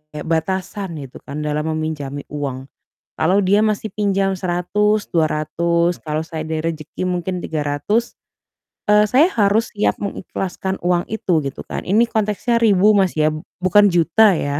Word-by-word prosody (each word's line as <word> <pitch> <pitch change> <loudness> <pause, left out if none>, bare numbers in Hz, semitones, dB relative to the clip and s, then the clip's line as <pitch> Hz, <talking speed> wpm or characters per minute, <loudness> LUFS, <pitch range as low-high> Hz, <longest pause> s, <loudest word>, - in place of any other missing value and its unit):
kayak 150 - -6
batasan 185 +3 -2
gitu 130 - -11
kan 145 +2 -6
dalam 150 +1 -1
meminjami 145 -3 -4
uang. 135 -3 -4 0.5
Kalau 185 +5 +3
dia 200 +2 +3
masih 215 0 -1
pinjam 195 -2 +1
Rp100.000, 205 +4 0
Rp200.000, 170 +2 +1
kalau 155 0 -2
saya 160 -1 -6
ada 160 0 -2
rejeki 155 +3 -6
mungkin 180 0 -2
Rp300.000, 155 +9 -1 0.8
eee, 210 0 +5
saya 265 +10 +5
harus 210 +1 +2
siap 205 - +1
mengikhlaskan 190 -1 -4
uang 175 0 +1
itu 200 -6 0
gitu 135 -1 -5
kan. - - -5
Ini 210 +5 +4
konteksnya 220 +2 0
ribu 210 -2 +5
Mas, 190 -3 +2
ya, 155 0 +2
b 155 - -5 0.2
bukan 205 +3 +5
juta 175 +4 +4
ya, 145 -1 -2
180 Hz, 150 wpm, -20 LUFS, 155-205 Hz, 0.8 s, eee